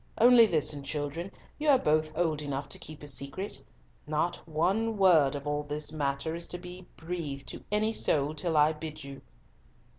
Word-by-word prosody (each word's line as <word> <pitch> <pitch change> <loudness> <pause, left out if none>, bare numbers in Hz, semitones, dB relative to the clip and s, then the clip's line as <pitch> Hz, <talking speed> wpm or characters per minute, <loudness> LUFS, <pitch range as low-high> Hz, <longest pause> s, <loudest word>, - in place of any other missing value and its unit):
Only 240 -1 +7
listen, 150 -4 0
children, 150 +6 -4 0.3
you 300 0 +1
are 275 - +7
both 155 -6 +1
old 160 -4 +1
enough 140 -1 -3
to - - -4
keep 155 -1 -9
a - - -8
secret. 140 +8 -2 0.4
Not 155 +3 0
one 200 +8 +1
word 165 -8 +5
of 140 0 -6
all 145 0 -1
this 150 +1 -3
matter 145 +1 -2
is 170 0 -1
to 175 - -5
be 180 0 -10
breathed 160 -5 -5
to - - -7
any 215 +1 +1
soul 150 -7 +1
till 160 +1 -1
I 150 +1 +5
bid 155 -1 -7
you." 140 0 -9
155 Hz, 180 wpm, -29 LUFS, 145-180 Hz, 0.4 s, Only